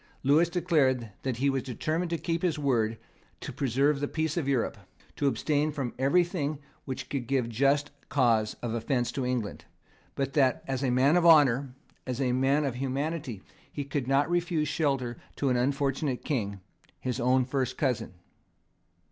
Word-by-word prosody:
Lewis 155 +5 +4
declared 135 - +1
that 130 -3 -2
he 135 +3 +1
was 135 -1 +1
determined 155 +8 -2
to 170 - -1
keep 165 +1 -2
his 170 -4 0
word, 115 -6 +1 0.4
to - - -7
preserve 140 +2 +1
the 145 - -1
peace 155 0 -2
of 165 -6 -1
Europe, 135 -4 0 0.4
to 145 - 0
abstain 145 +4 +1
from 135 -5 -3
everything 155 +1 +1 0.3
which 130 -2 -5
could 130 -4 -3
give 130 -3 +1
just 140 +5 +1 0.2
cause 115 -6 +2
of 115 -2 -2
offence 120 +1 -1
to 135 - -3
England, 125 -4 -3 0.5
but 135 -1 -2
that, 135 -4 +2
as 135 0 -2
a 130 - +1
man 130 +5 +4
of 175 - +3
honour, 140 -5 +5 0.3
as 130 0 -3
a 130 -2 +1
man 135 +4 +2
of 135 - -1
humanity, 135 - -3 0.3
he 145 - -4
could 140 -2 -3
not 140 +2 +3
refuse 170 -3 0
shelter 135 -6 -1 0.2
to 140 - 0
an 125 - +2
unfortunate 135 +1 0
King, 100 -9 -2 0.4
his 125 -1 -3
own 125 +1 +3
first 130 -1 -2
cousin. 120 -8 -1
135 Hz, 170 wpm, -28 LUFS, 125-150 Hz, 0.5 s, honour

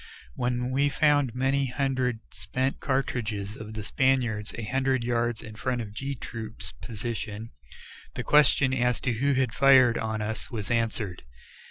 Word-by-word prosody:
When 125 - -1
we 140 +2 +2
found 145 -5 +2
many 135 +1 +1
hundred 125 -2 -1
spent 125 +8 -2
cartridges 110 -7 -2
of 110 0 -8
the 110 - -4
Spaniards 120 -3 +1
a 115 - -4
hundred 130 +2 0
yards 120 -1 0
in 110 - -9
front 125 +3 -2
of 105 -3 -6
G 135 +5 -4
Troop's 115 -3 -6
position, 110 -1 -5 0.6
the - - -3
question 140 -2 +4
as 125 -2 +1
to 125 - 0
who 140 +5 +1
had 130 -3 +1
fired 130 -3 +6
on 110 -1 -2
us 105 +1 -3
was 110 -2 -4
answered. 110 -5 -1
120 Hz, 155 wpm, -27 LUFS, 110-130 Hz, 0.6 s, fired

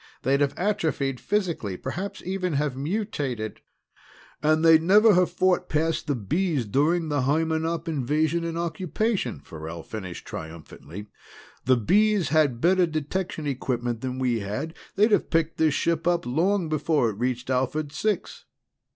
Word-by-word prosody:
They'd 140 +2 +2
have 140 -1 +1
atrophied 160 -9 -1
physically, 170 - -1
perhaps 185 - -5
even 185 -2 -2
have 145 -2 0
mutated 140 - -3 0.4
" - - -25
"And 155 +2 +3
they'd 160 -1 +7
never 210 +5 +6
have 180 -1 +3
fought 180 0 +1
past 160 +1 0
the 145 - +1
Bees 145 - -1
during 155 - +1
the 145 -2 +1
Hymenop 160 +4 0
invasion 155 +3 0
and 165 0 -3
occupation," 170 - -2
Farrell 80 +2 -8
finished 95 -5 -7
triumphantly. 80 +4 -9 0.6
"The 130 0 +4
Bees 205 - +3
had 150 -7 +2
better 180 +4 +4
detection 155 +1 -3
equipment 120 -4 -2
than 130 -1 -3
we 125 -3 0
had. 110 +11 -4 0.2
They'd 215 +3 +4
have - - +2
picked 165 -1 0
this 155 -3 +3
ship 165 0 0
up 175 -1 +1
long 170 +8 +1
before 150 -5 +1
it 100 - -11
reached 125 +1 -2
Alphard 135 +4 -1
Six." 210 +7 -2
155 Hz, 150 wpm, -25 LUFS, 125-175 Hz, 0.6 s, they'd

